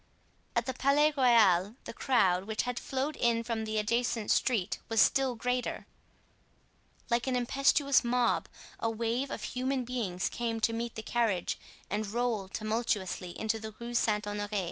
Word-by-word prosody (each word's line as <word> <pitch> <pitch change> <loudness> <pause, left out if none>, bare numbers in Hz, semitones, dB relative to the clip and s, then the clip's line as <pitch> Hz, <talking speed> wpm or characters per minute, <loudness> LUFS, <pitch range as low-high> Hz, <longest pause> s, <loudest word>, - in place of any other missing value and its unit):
At - - +1
the 260 - -2
Palais 290 +4 +3
Royal, 220 -7 +4
the - - -7
crowd, 190 -8 +2
which 220 0 -1
had 250 -1 -3
flowed 275 +3 -2
in 230 -1 +1
from 225 -2 -2
the 215 0 -2
adjacent 230 0 0
street 220 -6 +1
was 225 -1 +1
still 265 0 +4
greater; 250 +2 -2 1.3
like 235 +2 +1
an 260 - +1
impetuous 275 +3 +3
mob, 245 0 +1 0.3
a 225 - 0
wave 230 +4 -1
of - - -5
human 260 0 -2
beings 215 -8 -2
came 230 -1 -2
to 225 +2 +2
meet 235 0 -3
the 220 - -6
carriage 220 -7 0 0.3
and 210 +1 -2
rolled 220 -3 -1
tumultuously 215 -5 -2
into 220 0 -1
the 220 -1 -8
Rue 235 0 -6
Saint 215 -3 +1
Honore. 205 0 -3
230 Hz, 160 wpm, -30 LUFS, 215-250 Hz, 1.3 s, Royal